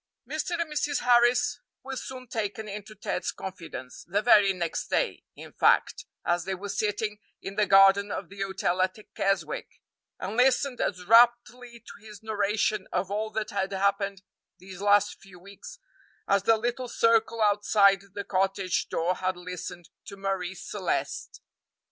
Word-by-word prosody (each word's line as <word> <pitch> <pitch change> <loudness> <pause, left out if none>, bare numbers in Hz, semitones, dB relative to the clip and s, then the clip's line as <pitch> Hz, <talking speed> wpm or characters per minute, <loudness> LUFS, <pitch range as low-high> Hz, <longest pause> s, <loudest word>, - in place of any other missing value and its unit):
Mr. 310 +4 -3
and 325 -3 -2
Mrs. 290 -1 -1
Harris 240 0 +3 0.2
were 265 0 -6
soon 255 0 -7
taken 220 -2 -4
into 210 +1 -8
Ted's 185 -3 -3
confidence 165 -9 -8
the 200 +4 0
very 205 -4 +6
next 175 -3 -3
day, - - -1
in - - -12
fact, - - +2 0.2
as 175 0 +1
they 190 +2 -3
were 200 +2 -7
sitting 210 0 -2 0.2
in 195 - -5
the 210 0 +2
garden 195 +1 +6
of 195 - -4
the 195 +2 -10
hotel 190 -2 -1
at 185 +2 0 0.2
Keswick 195 -6 -2 0.4
and 200 +5 -5
listened 260 +1 +2
as 180 -2 -2
raptly 240 +2 +3
to - - -13
his 210 -1 -12
narration 210 -1 0
of 185 +1 -2
all 215 +2 -2
that 220 0 -3
had 195 -1 -2
happened 195 0 0 0.3
these 190 0 -11
last 205 0 +3
few 195 -2 -15
weeks 200 - -12 0.5
as 200 0 +3
the 225 +3 +3
little 240 +3 -3
circle 230 -1 +2
outside 205 -2 +4
the 200 - -3
cottage 190 -1 -1
door 170 +2 0
had 185 0 -2
listened 175 -1 -8 0.2
to 200 - -9
Marie 195 -2 -3
Celeste. - - -4
200 Hz, 155 wpm, -27 LUFS, 190-225 Hz, 0.5 s, very